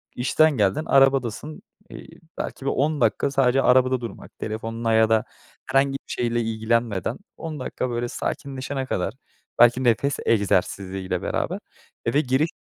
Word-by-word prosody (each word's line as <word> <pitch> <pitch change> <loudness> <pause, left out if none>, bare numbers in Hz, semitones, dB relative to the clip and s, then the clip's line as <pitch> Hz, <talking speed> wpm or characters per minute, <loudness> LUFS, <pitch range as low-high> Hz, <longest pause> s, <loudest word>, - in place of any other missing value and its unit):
işten 155 +5 +3
geldin, 105 +9 +1
arabadasın, 135 - +2 0.3
iii, - - -12 0.2
belki 135 - -5
bir - - +2
10 150 +2 0
dakika 140 - +2
sadece 135 -1 +3
arabada 130 0 +3
durmak 115 - -9
telefonla 115 +1 -2
ya 110 0 +4
da 110 -1 +3 0.4
herhangi 135 +1 +2
bir 135 - -3
şeyle 120 -1 0
ilgilenmeden 115 -1 -1 0.2
10 155 -2 -6
dakika 130 0 -3
böyle 120 0 -2
sakinleşene 135 +2 -4
kadar, 95 -5 -2 0.5
belki, 120 +2 +6
nefes 130 +4 +2
egzersiziyle 95 -3 0
beraber - - -2 0.5
eve 130 +6 +2
giriş 135 +4 +1
120 Hz, 140 wpm, -24 LUFS, 110-135 Hz, 0.5 s, belki